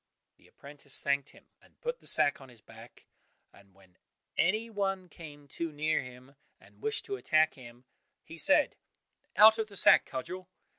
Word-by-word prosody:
'" -, -, -56 dB
The -, -, -23 dB
apprentice 140 Hz, -1 st, -2 dB
thanked 140 Hz, -1 st, -1 dB
him, -, -, -19 dB, 0.2 s
and -, -, -26 dB
put 485 Hz, +1 st, -4 dB
the -, -, -4 dB
sack 140 Hz, -1 st, +2 dB
on 135 Hz, -, -13 dB
his 120 Hz, -2 st, -17 dB
back, 115 Hz, +2 st, -16 dB, 0.5 s
and 100 Hz, -2 st, -21 dB
when 95 Hz, -2 st, -24 dB, 0.4 s
any 215 Hz, +6 st, +1 dB
one 195 Hz, -4 st, -3 dB
came 150 Hz, -3 st, -13 dB
too 165 Hz, +4 st, -4 dB
near 155 Hz, +1 st, 0 dB
him, 125 Hz, +2 st, -13 dB, 0.2 s
and -, -, -22 dB
wished 435 Hz, 0 st, -2 dB
to 400 Hz, -1 st, -4 dB
attack 155 Hz, -, +2 dB
him, 120 Hz, -1 st, -15 dB, 0.4 s
he 160 Hz, -, -12 dB
said, 290 Hz, -, +3 dB, 0.6 s
"Out 220 Hz, +1 st, +7 dB
of 220 Hz, -, -1 dB
the 205 Hz, -, -14 dB
sack, -, -, +5 dB
Cudgel!" 185 Hz, +8 st, -7 dB
150 Hz, 180 wpm, -30 LUFS, 130-195 Hz, 0.6 s, Out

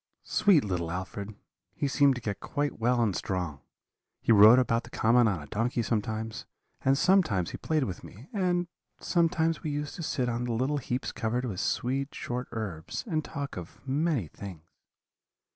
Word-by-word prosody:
"'Sweet 200 Hz, -7 st, +4 dB
little 90 Hz, -5 st, -2 dB
Alfred! 100 Hz, +4 st, -5 dB, 0.4 s
He 145 Hz, -, 0 dB
seemed 140 Hz, 0 st, +4 dB
to 125 Hz, -, -6 dB
get 105 Hz, -2 st, -3 dB
quite 145 Hz, -3 st, -2 dB
well 120 Hz, +1 st, +3 dB
and 105 Hz, -5 st, 0 dB
strong; 90 Hz, -7 st, -3 dB, 0.6 s
he -, -, +1 dB
rode 110 Hz, +3 st, +9 dB
about 115 Hz, -2 st, +2 dB
the -, -, -12 dB
common 120 Hz, +1 st, +4 dB
on 95 Hz, -5 st, 0 dB
a -, -, -9 dB
donkey 115 Hz, -, -1 dB
sometimes, 110 Hz, 0 st, -2 dB, 0.4 s
and 135 Hz, +1 st, +4 dB
sometimes 160 Hz, -, +3 dB
he -, -, -5 dB
played 155 Hz, -2 st, 0 dB
with 95 Hz, -8 st, -5 dB
me, 115 Hz, -, -12 dB
and 180 Hz, -3 st, +1 dB, 0.3 s
sometimes 165 Hz, -2 st, +1 dB
we 155 Hz, -, -3 dB
used 145 Hz, 0 st, -3 dB
to -, -, -5 dB
sit 130 Hz, -5 st, -1 dB
on 120 Hz, 0 st, -1 dB
the 120 Hz, -, -1 dB
little 130 Hz, +6 st, 0 dB
heaps 125 Hz, 0 st, -3 dB
covered 115 Hz, +2 st, -1 dB
with 100 Hz, -7 st, -4 dB
sweet 135 Hz, +4 st, -1 dB
short 125 Hz, +1 st, -4 dB
herbs, 100 Hz, -9 st, -4 dB
and 160 Hz, -8 st, -1 dB
talk 140 Hz, -2 st, -5 dB
of 85 Hz, -2 st, -8 dB
many 140 Hz, -, +1 dB
things. 90 Hz, -1 st, -9 dB
120 Hz, 175 wpm, -29 LUFS, 105-145 Hz, 0.6 s, rode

